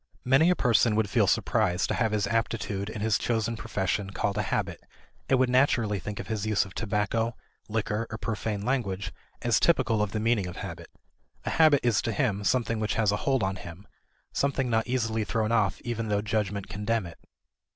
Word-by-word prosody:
Many 135 Hz, +7 st, +5 dB
a 180 Hz, -, +4 dB
person 115 Hz, -, +3 dB
would 110 Hz, -2 st, 0 dB
feel -, -, +3 dB
surprised 90 Hz, +1 st, +1 dB
to -, -, +1 dB
have 110 Hz, -3 st, +1 dB
his 105 Hz, -1 st, +1 dB
aptitude 110 Hz, -3 st, -1 dB
in 110 Hz, -1 st, -6 dB
his 110 Hz, -1 st, +2 dB
chosen 115 Hz, -1 st, 0 dB
profession 100 Hz, -3 st, -2 dB
called 100 Hz, +1 st, -1 dB
a -, -, +1 dB
habit, -, -, -2 dB, 0.5 s
and 135 Hz, -, +4 dB
would 130 Hz, 0 st, +3 dB
naturally 120 Hz, -5 st, +2 dB
think 105 Hz, +3 st, -6 dB
of -, -, -5 dB
his 110 Hz, -3 st, -3 dB
use 105 Hz, -2 st, +2 dB
of 95 Hz, -, -12 dB
tobacco, 110 Hz, +2 st, -1 dB, 0.3 s
liquor, 110 Hz, 0 st, -1 dB
or 110 Hz, -, -5 dB
profane 105 Hz, -2 st, -3 dB
language 105 Hz, -7 st, -1 dB, 0.3 s
as 120 Hz, -2 st, +3 dB
typical 120 Hz, -10 st, +3 dB
of 105 Hz, -2 st, -1 dB
the 110 Hz, -, -2 dB
meaning 110 Hz, -3 st, +1 dB
of 90 Hz, -, -7 dB
habit. -, -, -7 dB, 0.6 s
A -, -, -1 dB
habit 155 Hz, -4 st, +5 dB
is 120 Hz, -4 st, +3 dB
to 115 Hz, -, -2 dB
him 105 Hz, -3 st, 0 dB
something 115 Hz, 0 st, +1 dB
which 110 Hz, -1 st, -1 dB
has 110 Hz, -3 st, +2 dB
a 105 Hz, -, 0 dB
hold 135 Hz, -3 st, +1 dB
on 95 Hz, 0 st, -1 dB
him, 85 Hz, +3 st, -10 dB, 0.5 s
something 135 Hz, -3 st, 0 dB
not 110 Hz, 0 st, +1 dB
easily 115 Hz, -3 st, 0 dB
thrown 110 Hz, +1 st, -1 dB
off 105 Hz, -4 st, +2 dB
even 115 Hz, -2 st, -3 dB
though 105 Hz, -1 st, 0 dB
judgment 105 Hz, -2 st, -1 dB
condemn 110 Hz, 0 st, -1 dB
it. 85 Hz, -, -11 dB
110 Hz, 200 wpm, -27 LUFS, 105-115 Hz, 0.6 s, Many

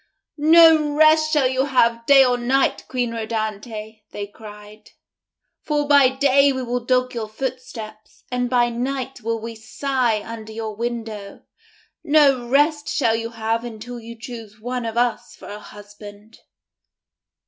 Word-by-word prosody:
"No 315 Hz, -1 st, +6 dB
rest 310 Hz, 0 st, +4 dB
shall 295 Hz, -4 st, +3 dB
you 260 Hz, +1 st, 0 dB
have 235 Hz, -4 st, +1 dB
day 275 Hz, -1 st, +7 dB
or 250 Hz, -1 st, +2 dB
night, 255 Hz, +3 st, 0 dB
Queen 245 Hz, -2 st, -2 dB
Rhodanthe," 220 Hz, -1 st, -5 dB
they 205 Hz, -, -6 dB
cried, 210 Hz, 0 st, -14 dB, 0.7 s
"for 295 Hz, -1 st, -1 dB
by 285 Hz, -3 st, +6 dB
day 275 Hz, +1 st, +3 dB
will 250 Hz, -2 st, -2 dB
we 240 Hz, -, -17 dB
dog 255 Hz, 0 st, +1 dB
your 230 Hz, -3 st, -4 dB
footsteps, 225 Hz, -2 st, -8 dB
and 250 Hz, 0 st, -1 dB
by 240 Hz, -1 st, +2 dB
night 260 Hz, +2 st, -4 dB
will 230 Hz, +1 st, -2 dB
we 230 Hz, +1 st, -7 dB
sigh 225 Hz, 0 st, -1 dB
under 220 Hz, -1 st, -8 dB
your 220 Hz, -1 st, -6 dB
window. 225 Hz, -3 st, -6 dB, 0.6 s
No 280 Hz, -5 st, +3 dB
rest 295 Hz, +2 st, +2 dB
shall 230 Hz, -7 st, +1 dB
you 230 Hz, 0 st, -4 dB
have 225 Hz, 0 st, -2 dB
until 240 Hz, +1 st, -8 dB
you 230 Hz, +1 st, -11 dB
choose 225 Hz, -3 st, -10 dB
one 245 Hz, +1 st, -4 dB
of 225 Hz, +1 st, -5 dB
us 240 Hz, -1 st, -1 dB
for -, -, -12 dB
a 205 Hz, +1 st, -7 dB
husband." 205 Hz, +1 st, -14 dB
240 Hz, 150 wpm, -21 LUFS, 220-265 Hz, 0.7 s, day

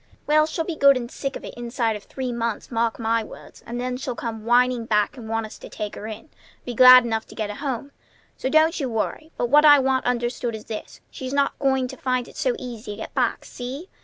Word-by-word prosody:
"Well, 305 Hz, +1 st, +4 dB
she'll 320 Hz, +1 st, -3 dB
be 340 Hz, -, -3 dB
good 280 Hz, -2 st, +6 dB
and 240 Hz, -1 st, -6 dB
sick 275 Hz, -1 st, -4 dB
of -, -, -7 dB
it -, -, -8 dB
inside 235 Hz, -2 st, -2 dB
of 210 Hz, -, -9 dB
three 260 Hz, -2 st, -4 dB
months, 235 Hz, -1 st, -3 dB
mark 230 Hz, -1 st, 0 dB
my 230 Hz, 0 st, 0 dB
words; -, -, -13 dB
and 240 Hz, +1 st, -4 dB
then 250 Hz, 0 st, -2 dB
she'll 255 Hz, -1 st, -4 dB
come 225 Hz, -2 st, -5 dB
whining 245 Hz, 0 st, +3 dB
back 210 Hz, +2 st, +1 dB
and 230 Hz, -4 st, -9 dB
want 225 Hz, 0 st, -1 dB
us 215 Hz, -, -11 dB
to -, -, -10 dB
take 210 Hz, -1 st, -5 dB
her 215 Hz, -, -7 dB
in; 220 Hz, +7 st, -8 dB, 0.4 s
be 245 Hz, -, -4 dB
glad 255 Hz, +1 st, +9 dB
enough 225 Hz, -1 st, -2 dB
to -, -, -13 dB
get 215 Hz, -2 st, -3 dB
a -, -, -7 dB
home. 275 Hz, -1 st, -4 dB, 0.4 s
So 260 Hz, -, -3 dB
don't 315 Hz, +4 st, +4 dB
you 270 Hz, -4 st, -1 dB
worry. 245 Hz, +8 st, -3 dB
But 240 Hz, -, -1 dB
what 295 Hz, +1 st, +7 dB
I 295 Hz, -1 st, +9 dB
want 265 Hz, -1 st, +1 dB
understood 240 Hz, -1 st, -1 dB
is 215 Hz, -, -9 dB
this: 215 Hz, -, -7 dB
She's 260 Hz, -2 st, -6 dB
not 280 Hz, 0 st, +1 dB
going 265 Hz, -2 st, +1 dB
to -, -, -9 dB
find 255 Hz, -2 st, -1 dB
it -, -, -15 dB
so -, -, 0 dB
easy 235 Hz, -4 st, -7 dB
to -, -, -10 dB
get -, -, -7 dB
back. -, -, 0 dB
See? 265 Hz, +8 st, -7 dB
245 Hz, 250 wpm, -23 LUFS, 225-270 Hz, 0.4 s, glad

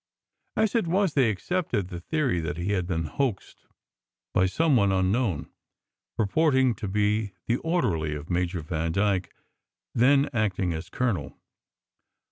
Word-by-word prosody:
As 220 Hz, -1 st, +2 dB
it 230 Hz, -7 st, +1 dB
was, 185 Hz, -1 st, +2 dB
they 130 Hz, -5 st, +4 dB
accepted 110 Hz, -, -1 dB
the 85 Hz, -, -6 dB
theory 135 Hz, -, 0 dB
that 85 Hz, +1 st, -3 dB
he 90 Hz, +4 st, -2 dB
had 90 Hz, -4 st, 0 dB
been 80 Hz, -3 st, -1 dB
hoaxed 110 Hz, -, -3 dB, 0.7 s
by 95 Hz, -, +3 dB
some 155 Hz, -, +2 dB
one 100 Hz, -5 st, +4 dB
unknown, 95 Hz, -, 0 dB, 0.7 s
purporting 130 Hz, +3 st, +3 dB
to 110 Hz, -, -6 dB
be 105 Hz, +1 st, 0 dB
the 120 Hz, -, +1 dB
orderly 85 Hz, -, 0 dB
of 75 Hz, +1 st, -7 dB
Major 90 Hz, 0 st, -1 dB
Vandyke, 90 Hz, +5 st, 0 dB, 0.6 s
then 140 Hz, +4 st, +4 dB
acting 95 Hz, -6 st, 0 dB
as 80 Hz, +1 st, -6 dB
colonel. 110 Hz, -, -2 dB
100 Hz, 135 wpm, -26 LUFS, 90-130 Hz, 0.7 s, they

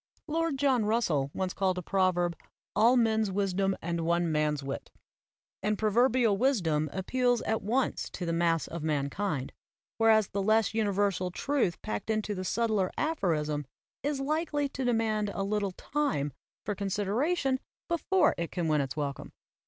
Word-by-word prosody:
Lord 325 Hz, -2 st, 0 dB
John 265 Hz, -4 st, +3 dB
Russell 175 Hz, -, +1 dB
once 185 Hz, +2 st, -2 dB
called 190 Hz, -1 st, 0 dB
a 180 Hz, -, -3 dB
proverb 175 Hz, -2 st, +1 dB, 0.4 s
"All 235 Hz, +4 st, +5 dB
men's 220 Hz, -3 st, +2 dB
wisdom 195 Hz, 0 st, 0 dB
and 170 Hz, 0 st, -1 dB
one 170 Hz, 0 st, +1 dB
man's 150 Hz, -2 st, 0 dB
wit"; 135 Hz, 0 st, -5 dB, 0.7 s
and 210 Hz, +1 st, 0 dB
prover 220 Hz, +5 st, +3 dB
bial 230 Hz, -4 st, +3 dB
wisdom 170 Hz, -, +1 dB
appeals 245 Hz, +5 st, +1 dB
at 220 Hz, 0 st, 0 dB
once 245 Hz, +6 st, 0 dB
to 180 Hz, -, -4 dB
the 170 Hz, -, -1 dB
mass 165 Hz, -1 st, +2 dB
of 170 Hz, -, -6 dB
man 145 Hz, -2 st, -1 dB
kind, 165 Hz, -9 st, -2 dB, 0.5 s
whereas 220 Hz, -2 st, +5 dB
the 200 Hz, -, -2 dB
less 215 Hz, +2 st, +3 dB
universal 200 Hz, -4 st, +1 dB
truth 240 Hz, -, 0 dB
packed 105 Hz, -, -4 dB
into 215 Hz, -1 st, 0 dB
the 185 Hz, -2 st, -4 dB
subtler 215 Hz, -1 st, +1 dB
aphorism 155 Hz, -, 0 dB, 0.3 s
is 285 Hz, 0 st, -1 dB
likely 295 Hz, 0 st, 0 dB
to 265 Hz, -, -4 dB
demand 220 Hz, -3 st, +1 dB
a 195 Hz, -, -1 dB
little 200 Hz, -1 st, -1 dB
time 165 Hz, -, -1 dB, 0.3 s
for 210 Hz, -, -1 dB
consideration 225 Hz, -, 0 dB, 0.3 s
before 345 Hz, +2 st, +2 dB
it 170 Hz, -, -2 dB
can 175 Hz, -3 st, -2 dB
win 155 Hz, -2 st, +3 dB
its 135 Hz, +2 st, -4 dB
welcome. 140 Hz, -2 st, -4 dB
200 Hz, 160 wpm, -29 LUFS, 170-240 Hz, 0.7 s, All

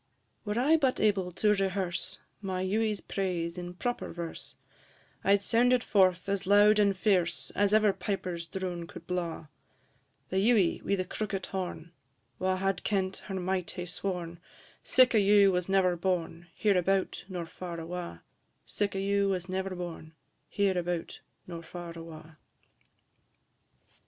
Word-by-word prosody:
I. 205 Hz, -, -16 dB
Were 210 Hz, +3 st, 0 dB
I 300 Hz, +6 st, +5 dB
but 270 Hz, -4 st, +1 dB
able 195 Hz, -4 st, +2 dB
to 210 Hz, +3 st, +3 dB
rehearse 190 Hz, -3 st, -1 dB, 0.2 s
My 185 Hz, -2 st, -2 dB
Ewie's 210 Hz, +2 st, 0 dB
praise 175 Hz, -4 st, -2 dB
in 175 Hz, 0 st, -6 dB
proper 245 Hz, +6 st, -3 dB
verse, 170 Hz, -1 st, -6 dB, 0.7 s
I 200 Hz, -, +5 dB
'd 200 Hz, -, -2 dB
sound 240 Hz, +4 st, +3 dB
it 250 Hz, -, +2 dB
forth 185 Hz, -3 st, +3 dB
as 195 Hz, -1 st, -1 dB
loud 205 Hz, +1 st, +6 dB
and 200 Hz, -2 st, +3 dB
fierce 185 Hz, -4 st, +1 dB
As 205 Hz, 0 st, +1 dB
ever 215 Hz, -2 st, +4 dB
piper's 180 Hz, -3 st, -3 dB
drone 175 Hz, -1 st, -4 dB
could 170 Hz, -, -11 dB
blaw; 170 Hz, -3 st, -3 dB, 0.8 s
The 190 Hz, -, -1 dB
Ewie 205 Hz, -4 st, +3 dB
wi' 200 Hz, -, +1 dB
the 185 Hz, -1 st, -2 dB
crookit 195 Hz, 0 st, -3 dB
horn, 180 Hz, -3 st, -5 dB, 0.5 s
Wha 185 Hz, 0 st, +1 dB
had 195 Hz, +1 st, -1 dB
kent 190 Hz, -2 st, 0 dB
her 195 Hz, -, -4 dB
might 185 Hz, -1 st, -1 dB
hae 180 Hz, -, -4 dB
sworn 175 Hz, -2 st, -4 dB, 0.4 s
Sic 255 Hz, -1 st, +4 dB
a 220 Hz, -, +5 dB
Ewe 200 Hz, -1 st, +6 dB
was 180 Hz, 0 st, -1 dB
never 190 Hz, -2 st, +3 dB
born, 175 Hz, -1 st, -2 dB
Hereabout 195 Hz, -2 st, +1 dB
nor 180 Hz, -3 st, -4 dB
far 170 Hz, 0 st, -7 dB
awa'; 175 Hz, +1 st, -6 dB, 0.4 s
Sic 200 Hz, -1 st, -2 dB
a -, -, -1 dB
Ewe 200 Hz, 0 st, +1 dB
was 185 Hz, -2 st, -1 dB
never 190 Hz, 0 st, -3 dB
born, 170 Hz, -3 st, -7 dB, 0.4 s
Hereabout 180 Hz, -4 st, -1 dB, 0.3 s
nor 170 Hz, -2 st, -7 dB
far 170 Hz, 0 st, -8 dB
awa'. 160 Hz, -1 st, -10 dB
190 Hz, 150 wpm, -30 LUFS, 175-200 Hz, 0.8 s, loud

